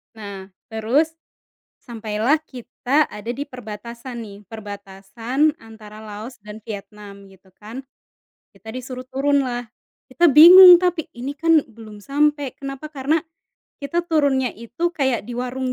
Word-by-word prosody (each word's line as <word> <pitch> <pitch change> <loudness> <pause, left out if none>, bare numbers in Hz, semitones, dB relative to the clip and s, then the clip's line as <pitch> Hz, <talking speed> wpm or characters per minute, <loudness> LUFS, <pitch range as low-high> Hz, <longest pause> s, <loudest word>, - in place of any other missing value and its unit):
Nah, 200 -3 -9 0.2
terus 245 +9 +1 0.7
sampailah 225 +3 -1
kita 255 +3 -1
ada 225 +3 -6
di 280 +3 -6
perbatasan 235 +1 -9
nih, 200 -3 -10
perbatasan 220 - -3
antara 220 -1 -13
Laos 215 +4 -9
dan 210 +1 -10
Vietnam 205 -2 -10
gitu 190 0 -22
kan. 225 +5 -9 0.7
Kita 220 - -16
disuruh 255 +1 -7
turun 280 +1 +1
lah, 245 -2 -3 0.5
kita 345 +4 +4
bingung 355 +5 +10
tapi, 350 -3 -1
"Ini 255 +4 -6
kan 330 -3 +4
belum 215 -2 -14
sampai, 290 -1 0
kenapa?" 275 +2 -8
karena 280 +3 0 0.6
kita 340 +5 -2
turunnya 280 -6 +1
itu 240 +10 -4
kayak 265 -8 -1
di 240 - -8
warung 255 +1 -3
245 Hz, 130 wpm, -21 LUFS, 215-285 Hz, 0.7 s, bingung